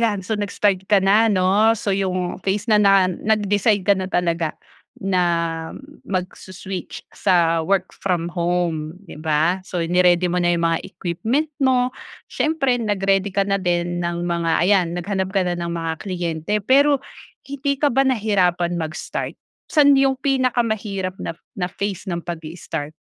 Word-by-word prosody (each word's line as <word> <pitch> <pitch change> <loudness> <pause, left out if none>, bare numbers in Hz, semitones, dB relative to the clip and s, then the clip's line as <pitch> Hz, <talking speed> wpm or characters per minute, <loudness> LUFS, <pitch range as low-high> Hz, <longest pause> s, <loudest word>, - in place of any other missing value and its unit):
'yan. 210 -4 +1
So, 220 - -2
nag-start 200 -2 0
ka 205 - +6
na 215 +3 +5
'no. 200 +4 +3
So, 200 - -1
yung 185 -2 -2
phase 195 +3 -1
na 210 -2 +4
na 195 -2 +5
nag-decide 205 +1 +1
ka 200 - +5
na 190 -1 -4
talaga 170 -2 0 0.5
na 170 -3 0 0.3
magso-switch 185 0 -5
sa 170 -2 +2
work 190 -1 +1
from 175 -3 -1
home, 170 -2 -1
'di 150 - -11
ba. 160 +4 +1
So, 175 -2 -2
ni-ready 180 +1 +3
mo 180 - 0
na 175 - +3
yung 170 - -1
mga 165 0 0
equipment 225 - -2
mo. 255 -1 +3 0.4
Siyempre 305 -5 +1
nag-ready 195 -2 0
ka 200 - +3
na 200 0 +1
din 175 -1 -1
ng 170 0 -2
mga 170 -1 +1
ayan, 190 -3 +4
naghanap 190 +1 -2
ka 195 - +3
na 175 - 0
ng 170 0 -3
mga 165 -1 -2
kliyente. 175 -2 -3
Pero, 280 +3 +4 0.5
hindi 280 0 -2
ka 295 - +2
ba 270 - +4
nahirapan 185 -7 +1
mag-start? 160 +3 -4 0.3
Saan 285 -2 +6
yung 270 -1 +3
pinakamahirap 225 -8 -1
na 165 - -4 0.2
na 180 - 0
phase 200 0 -4
ng 170 - -2
pagi-start? 160 -2 -6
185 Hz, 155 wpm, -21 LUFS, 175-210 Hz, 0.5 s, ka